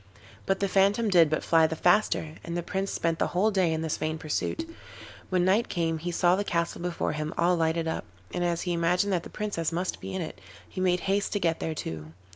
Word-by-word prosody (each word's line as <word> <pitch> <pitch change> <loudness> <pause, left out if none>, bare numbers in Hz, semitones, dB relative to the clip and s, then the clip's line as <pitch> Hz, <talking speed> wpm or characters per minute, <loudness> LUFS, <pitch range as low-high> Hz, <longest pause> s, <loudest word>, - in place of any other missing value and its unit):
But 195 0 +1
the 200 - +2
phantom 200 +4 +3
did 170 -5 +6
but 155 - -1
fly 165 -1 +4
the 160 - -3
faster, 175 -3 +2
and 170 0 -4
the 175 - -2
Prince 195 +2 -2
spent 165 -1 -1
the - - +2
whole 215 +4 +4
day 185 -4 +2
in 160 0 -1
this 160 - -1
vain 155 0 -2
pursuit. 160 - -2 0.6
When 180 -1 +2
night 205 +5 +2
came 165 -2 -1
he 175 +3 -4
saw 175 +1 +3
the 200 - -1
castle 170 -4 -1
before 175 -1 -1
him 155 +1 -4
all 175 +2 +3
lighted 165 0 0
up, 160 - -3 0.3
and 175 - -1
as 170 -1 0
he 180 - -1
imagined 180 +4 +1
that 175 - +1
the - - -10
Princess 200 -7 -2
must 180 +2 -3
be - - -5
in 185 - -1
it, 155 - -8 0.3
he 185 - -5
made 180 -1 +2
haste 195 +1 0
to 205 - +1
get 165 -3 0
there 160 - -3
too. 80 - -6
175 Hz, 240 wpm, -27 LUFS, 165-190 Hz, 0.6 s, did